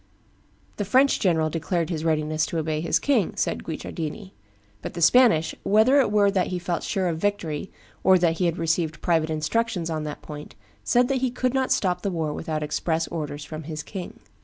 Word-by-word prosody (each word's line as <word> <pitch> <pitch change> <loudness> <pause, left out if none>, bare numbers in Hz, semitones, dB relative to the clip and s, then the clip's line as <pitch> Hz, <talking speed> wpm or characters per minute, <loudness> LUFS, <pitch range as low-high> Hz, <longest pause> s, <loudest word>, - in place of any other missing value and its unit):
"The 205 - -1
French 260 +7 +3
general 160 -5 +2
declared 165 +1 -1
his 160 -2 -3
readiness 155 -1 0
to 170 - -3
obey 155 -1 -1
his 165 - +2
king," 250 -10 +1
says - - 0
Guicciardini; 165 +4 -6 0.5
"but - - -7
the - - -4
Spanish, 165 -3 +5
whether 220 +7 +4
it 245 -6 +2
were 205 -1 +4
that 190 -2 +1
he 180 - -3
felt 175 -1 -2
sure 190 -2 -1
of 165 -2 -2
victory 190 -5 -2 0.3
or 190 0 +6
that 170 -2 +1
he 180 - +2
had 170 0 -1
received 165 -1 -1
private 160 -2 +2
instructions 170 +3 -1
on 155 -1 -2
that 150 -1 -7
point, 150 -1 -9 0.3
said 245 0 +3
that 265 -2 0
he 260 - +1
could 250 +1 -1
not 265 -1 0
stop 180 -2 +1
the 200 - -1
war 160 -4 -2
without 155 -1 -3
express 160 +2 -1
orders 150 -3 -5
from 155 0 -7
his 155 -1 -5
king." 190 -4 -8
170 Hz, 200 wpm, -25 LUFS, 155-205 Hz, 0.5 s, or